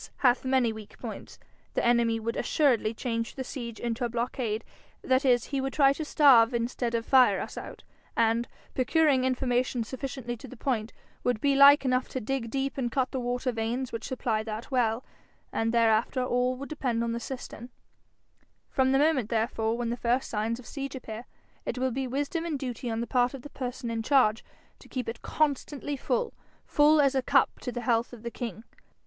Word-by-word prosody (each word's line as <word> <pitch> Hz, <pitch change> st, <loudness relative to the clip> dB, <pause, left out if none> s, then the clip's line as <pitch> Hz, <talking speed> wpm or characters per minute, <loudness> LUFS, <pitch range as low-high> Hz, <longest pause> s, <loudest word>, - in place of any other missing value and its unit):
hath 245 Hz, 0 st, +4 dB
many 260 Hz, -3 st, +2 dB
weak 215 Hz, -2 st, -11 dB
points -, -, -8 dB, 0.4 s
the -, -, +1 dB
enemy 235 Hz, -1 st, +3 dB
would 230 Hz, +1 st, -3 dB
assuredly 250 Hz, -8 st, +2 dB
change 230 Hz, -1 st, -3 dB
the 265 Hz, -, -3 dB
siege 235 Hz, -4 st, -6 dB
into 235 Hz, +1 st, -2 dB
a 240 Hz, -, 0 dB
blockade; 235 Hz, -2 st, -2 dB, 0.4 s
that 260 Hz, +2 st, +2 dB
is, 245 Hz, -3 st, +4 dB
he 275 Hz, -2 st, -2 dB
would 270 Hz, 0 st, -3 dB
try 275 Hz, -2 st, +5 dB
to 315 Hz, -, -4 dB
starve 255 Hz, -6 st, +5 dB
instead 235 Hz, 0 st, -1 dB
of 230 Hz, 0 st, -1 dB
fire 260 Hz, -2 st, +5 dB
us -, -, -6 dB
out; -, -, -8 dB, 0.3 s
and, 230 Hz, +1 st, +2 dB, 0.3 s
procuring 275 Hz, 0 st, +3 dB
information 250 Hz, -1 st, 0 dB
sufficiently 255 Hz, 0 st, -5 dB
to 240 Hz, -, -11 dB
the 260 Hz, -, -11 dB
point, 225 Hz, -3 st, -1 dB, 0.3 s
would 245 Hz, -3 st, +1 dB
be 280 Hz, +3 st, +2 dB
like 280 Hz, +1 st, +8 dB
enough 255 Hz, 0 st, +1 dB
to 260 Hz, -, -3 dB
dig 245 Hz, 0 st, -3 dB
deep 270 Hz, +2 st, -2 dB
and 240 Hz, -2 st, -1 dB
cut 260 Hz, 0 st, 0 dB
the 260 Hz, -, -2 dB
water 245 Hz, +1 st, -1 dB
veins 235 Hz, +3 st, -2 dB
which 230 Hz, -, -5 dB
supply 235 Hz, -4 st, -1 dB
that 220 Hz, +3 st, -6 dB
well; 240 Hz, -2 st, +1 dB, 0.5 s
and 225 Hz, 0 st, 0 dB
thereafter 230 Hz, +2 st, +2 dB
all 250 Hz, 0 st, +1 dB
would 275 Hz, +2 st, -8 dB
depend 250 Hz, -6 st, -1 dB
on 235 Hz, -, -1 dB
the 235 Hz, -, -2 dB
cistern. 245 Hz, -1 st, -7 dB, 1.0 s
From 265 Hz, -1 st, +2 dB
the -, -, +5 dB
moment 280 Hz, -6 st, +2 dB
therefore 225 Hz, 0 st, 0 dB
when 240 Hz, -1 st, -2 dB
the 240 Hz, -, -2 dB
first 245 Hz, +2 st, 0 dB
signs 225 Hz, +2 st, -1 dB
of 255 Hz, -, -12 dB
siege 275 Hz, -1 st, -5 dB
appear, 230 Hz, -2 st, -7 dB, 0.4 s
it -, -, -4 dB
will 260 Hz, 0 st, 0 dB
be 265 Hz, +2 st, -2 dB
wisdom 285 Hz, +6 st, -2 dB
and 330 Hz, -4 st, -2 dB
duty 250 Hz, -2 st, -4 dB
on 225 Hz, 0 st, -2 dB
the -, -, -1 dB
part 245 Hz, +1 st, +1 dB
of 255 Hz, -, -10 dB
the 290 Hz, -, -10 dB
person 250 Hz, -2 st, -4 dB
in 225 Hz, -1 st, -2 dB
charge 230 Hz, -3 st, +3 dB, 0.4 s
to -, -, -17 dB
keep 255 Hz, -3 st, -4 dB
it 230 Hz, +1 st, -5 dB
constantly 290 Hz, -1 st, -1 dB
full 475 Hz, -, -1 dB, 0.3 s
full 300 Hz, +1 st, +4 dB
as 280 Hz, -2 st, +4 dB
a 265 Hz, -, +2 dB
cup -, -, +2 dB
to 250 Hz, -, -4 dB
the 245 Hz, -, -4 dB
health 235 Hz, -1 st, +1 dB
of 235 Hz, -2 st, -11 dB
the 235 Hz, -, -4 dB
king. 230 Hz, -3 st, -6 dB
245 Hz, 200 wpm, -28 LUFS, 230-270 Hz, 1.0 s, like